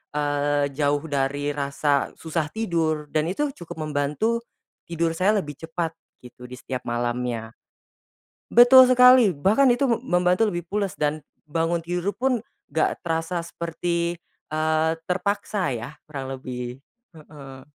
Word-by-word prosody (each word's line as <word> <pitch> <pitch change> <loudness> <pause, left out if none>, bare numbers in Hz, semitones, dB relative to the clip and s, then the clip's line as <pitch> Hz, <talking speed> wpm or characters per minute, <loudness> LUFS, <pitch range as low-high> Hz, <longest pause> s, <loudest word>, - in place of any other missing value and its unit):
eee, 145 -1 0
jauh 145 0 +1
dari 145 0 -1
rasa 140 0 0
susah 160 -1 -2
tidur 165 -8 -1
dan 155 0 +1
itu 290 +8 -1
cukup 160 -2 -7
membantu, 150 +12 0 0.5
tidur 170 0 0
saya 195 +5 +2
lebih 150 -6 -6
cepat 165 0 -3 0.3
gitu 125 0 -12
di 125 - -9
setiap 130 -1 -5
malamnya. 120 -1 -2 1.0
Betul 245 +2 +9
sekali 250 -3 +7
bahkan 215 - +4
itu 245 +3 0
mem 235 - +1
membantu 180 +4 +2
lebih 175 -3 -4
pules 200 -1 -2
dan, 150 +1 0 0.3
bangun 165 +2 0
tidur 175 +3 -2
pun 255 -1 +1 0.3
gak 160 - +1
terasa 165 +1 -1
seperti, 170 +1 -3 0.4
eee, 155 +1 +1 0.2
terpaksa 195 -1 -1
ya 120 +5 -6
kurang 135 -3 -6
lebih, 125 -1 -6 0.4
heeh. 140 -4 -12
160 Hz, 130 wpm, -24 LUFS, 145-180 Hz, 1.0 s, Betul